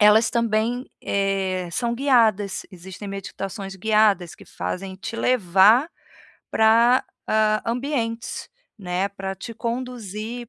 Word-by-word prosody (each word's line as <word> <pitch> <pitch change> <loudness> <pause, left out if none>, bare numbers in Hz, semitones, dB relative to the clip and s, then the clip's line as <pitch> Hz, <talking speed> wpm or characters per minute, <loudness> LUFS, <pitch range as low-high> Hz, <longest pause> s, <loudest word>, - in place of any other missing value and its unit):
elas 215 +2 +6
também, 235 +2 0
eh, 195 -2 -1
são 235 +3 -1
guiadas, 225 -7 +2
existem 190 +2 -9
meditações 195 0 -6
guiadas 205 -3 +2
que - - -15
fazem 190 0 -5
te 230 +4 -6
levar, 220 - +4
ah, - - -27 0.6
para 230 +3 +4 0.6
ambientes, 235 -2 -2 0.3
né. 185 +1 -1
Para 195 -1 -5
te 230 +5 -8
conduzir 235 -1 -5
215 Hz, 110 wpm, -23 LUFS, 195-235 Hz, 0.6 s, elas